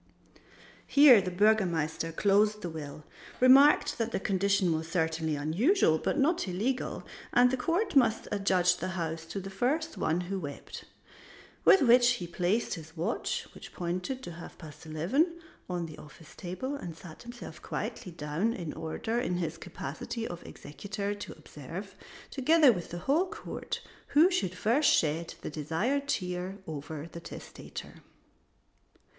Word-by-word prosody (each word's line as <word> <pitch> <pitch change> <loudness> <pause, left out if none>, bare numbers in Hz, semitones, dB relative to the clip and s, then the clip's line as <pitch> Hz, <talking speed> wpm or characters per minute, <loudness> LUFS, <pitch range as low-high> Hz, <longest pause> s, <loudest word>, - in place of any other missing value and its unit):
Here 280 -7 +8
the 185 - -3
Burgomaster 175 -5 +1
closed 210 +4 +2
the 175 - -3
will, 150 -1 -8 0.3
remarked 270 +3 +6
that 230 0 -1
the - - -1
condition 195 -3 +1
was 160 +1 -3
certainly 160 -2 0
unusual 160 - +2
but - - -1
not 315 - +2
illegal, 220 +9 -2 0.3
and 245 +1 +6
the - - +2
court 340 - -1
must 230 -5 +3
adjudge 185 -3 +2
the 180 - -3
house 165 -1 -3
to 180 +4 -5
the 195 0 -7
first 295 +11 -1
one 165 +3 +1
who 190 +2 -3
wept. 145 -5 -8 0.8
With 385 - +7
which 245 0 +6
he 185 -7 -4
placed 180 +6 0
his 160 -1 -9
watch, 185 +9 -2
which - - -12
pointed 185 +10 -3
to - - -6
half 170 0 -10
past 155 0 -12
eleven, 265 - 0 0.3
on 175 -2 -2
the 155 -2 -10
office 150 -1 -14
table, 185 +12 -5
and 175 - -6
sat 165 -3 -11
himself 240 0 -10
quietly 180 - -5
down 165 +7 -1
in 170 -8 -5
order 165 +9 -3
in 180 -8 -1
his 165 -2 -3
capacity 225 - -5
of 175 -1 -7
executor 200 +8 -5
to 205 - -7
observe, - - -9 0.4
together 295 +1 +5
with 175 -4 -6
the 175 - -5
whole 320 +7 +3
court, - - -6 0.3
who 325 +6 +5
should 190 - -1
first 230 +11 +3
shed 165 +2 +1
the - - -5
desired 190 - -1
tear 180 -4 -2
over 155 0 -6
the 170 - -7
testator. 165 - -9
185 Hz, 150 wpm, -30 LUFS, 165-245 Hz, 0.8 s, Here